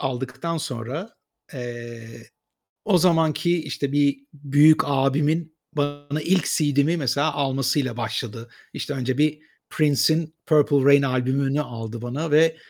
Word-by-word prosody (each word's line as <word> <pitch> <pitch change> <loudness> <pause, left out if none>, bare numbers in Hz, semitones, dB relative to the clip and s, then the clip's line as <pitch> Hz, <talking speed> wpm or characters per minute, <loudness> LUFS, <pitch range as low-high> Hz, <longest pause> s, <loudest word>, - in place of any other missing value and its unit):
aldıktan 135 +6 -3
sonra, 135 - -6 0.4
eee, 120 -2 -9 0.5
o 200 -4 +3
zamanki 170 0 +2
işte 140 -1 -3
bir 140 -1 +2 0.2
büyük 145 +2 +4
abimin 150 +4 0
bana 145 0 -3
ilk 185 +2 +1
CD'mi 145 +1 +1
mesela 145 0 0
almasıyla 135 -2 -1
başladı. 115 0 -5 0.2
İşte 145 - -5
önce 130 0 -2
bir 150 0 +1 0.3
Prince'in 155 +2 +1
"Purple 145 -3 +3
Rain" 140 0 +6
albümünü 135 +2 0
aldı 115 -4 -6
bana 145 +7 -4
ve 160 +2 +4
145 Hz, 120 wpm, -23 LUFS, 130-155 Hz, 0.5 s, Rain